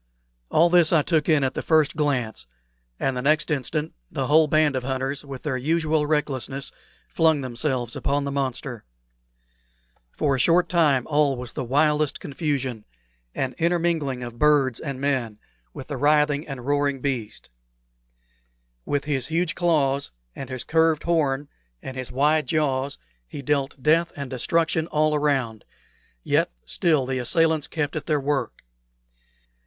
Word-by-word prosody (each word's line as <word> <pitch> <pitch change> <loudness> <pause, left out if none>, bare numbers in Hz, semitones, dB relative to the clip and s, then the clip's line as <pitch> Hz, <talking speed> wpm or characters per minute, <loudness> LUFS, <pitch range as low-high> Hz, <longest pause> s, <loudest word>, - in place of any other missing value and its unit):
All 170 +2 +4
this 175 -2 +5
I 160 -3 +4
took 160 0 +1
in 155 -3 +4
at 130 - 0
the - - -3
first 155 -3 +2
glance, 130 - -1 0.5
and 135 -1 0
the 125 - -2
next 150 +3 +2
instant 150 +2 -2 0.2
the - - -2
whole 155 +1 +5
band 155 -2 +3
of 130 - -1
hunters, 135 +2 -3
with 135 -2 -9
their 145 -4 -1
usual 155 +2 +1
recklessness, 140 -3 -2 0.4
flung 160 -3 +2
themselves 125 -1 -2
upon 145 +1 -1
the 140 - -3
monster. 130 -3 -3 1.3
For 145 -3 0
a 135 - -1
short 170 +6 +3
time 150 -8 +3
all 145 -2 +2
was 125 -1 -7
the - - -3
wildest 150 +3 +1
confusion 135 -6 -3 0.5
an 130 -1 -2
intermingling 165 -6 0
of 120 -1 -8
birds 145 -5 +3
and 140 -4 -5
men, 130 -6 -1 0.3
with 130 - -10
the 145 - -3
writhing 150 +1 +2
and 135 -3 -7
roaring 145 -1 +1
beast. 125 - -4 1.3
With 145 0 -1
his 135 -4 -1
huge 165 +2 0
claws 140 -6 +1 0.3
and 135 - -7
his 130 -2 -4
curved 160 -1 +2
horn 145 -4 0 0.4
and 130 - -7
his 130 -1 -5
wide 150 +2 +2
jaws 140 -2 0 0.3
he 140 - -8
dealt 140 -1 -1
death 165 +3 +3
and 140 -2 -6
destruction 160 +5 0
all 155 -1 +1
around; 135 -7 0 0.6
yet - - +1
still 155 -7 +1
the 130 0 -2
assailants 160 +4 +2
kept 155 -2 -3
at 155 -2 -5
their 150 -2 +2
work. 140 0 -2
145 Hz, 150 wpm, -24 LUFS, 130-155 Hz, 1.3 s, this